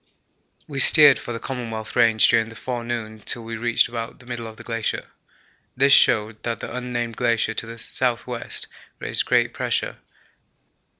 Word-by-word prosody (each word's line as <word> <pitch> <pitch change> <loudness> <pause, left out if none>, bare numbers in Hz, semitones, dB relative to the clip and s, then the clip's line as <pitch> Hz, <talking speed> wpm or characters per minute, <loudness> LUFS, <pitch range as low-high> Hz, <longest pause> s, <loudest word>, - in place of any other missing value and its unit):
We 140 -2 -5
steered 145 -2 +8
for - - -7
the 115 - -4
Commonwealth 115 -4 -6
Range 115 -3 +5
during 115 -1 +2
the 115 - -12
forenoon 115 -3 -5
till 120 - -1
we 115 0 -6
reached 115 +1 +2
about 115 -1 -6
the 125 - -18
middle 120 -2 -6
of 110 -1 -11
the - - -11
glacier. 115 -2 -3 0.7
This 140 +1 +5
showed 110 0 +3
that 115 -1 -3
the - - -7
unnamed 120 -2 -4
glacier 115 -2 +1
to 115 - -4
the 115 - -8
S.W. 120 +1 -2 0.6
raised - - +1
great - - +2
pressure. - - -2
115 Hz, 165 wpm, -23 LUFS, 115-125 Hz, 0.7 s, steered